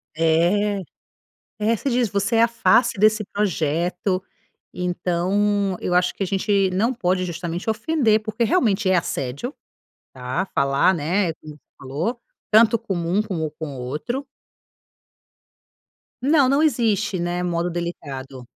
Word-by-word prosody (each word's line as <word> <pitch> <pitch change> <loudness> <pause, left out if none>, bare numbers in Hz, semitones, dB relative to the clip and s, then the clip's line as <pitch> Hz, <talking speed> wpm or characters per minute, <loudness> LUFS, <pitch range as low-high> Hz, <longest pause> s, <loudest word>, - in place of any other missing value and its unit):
É 175 +6 +2 0.8
é, 220 +2 +1
você 275 - -2
diz: 245 -2 +1
“Você 200 +3 0
é 225 - +5
a 230 - +5
face 235 -1 +3
desse 215 +1 +3
projeto”. 180 -1 -1 0.5
Então 185 +3 0
eu 180 - -1
acho 180 0 +2
que - - -4
a - - 0
gente 195 0 +1
não 225 +7 +1
pode 185 -4 0
justamente 175 +2 -5
ofender, 220 -1 +2
porque 215 +2 -1
realmente 215 - +2
é 190 - +4
assédio, 140 - -3 0.6
tá. 130 +9 -3
Falar, 140 +6 +3
né, 170 +3 0
como 155 -1 -12
você - - -25 0.2
falou, 155 - -3 0.3
tanto 225 +1 +5
com 195 - -4
um 175 +4 0
como 170 -8 -3
com 155 0 -6
o - - -7
outro. 155 - -4 2.0
Não, 280 +1 +4
não 275 +3 +3
existe, 215 - +1
né, 175 +1 -2
modo 175 0 -1
delicado. 140 -7 -6
190 Hz, 140 wpm, -22 LUFS, 170-215 Hz, 2.0 s, é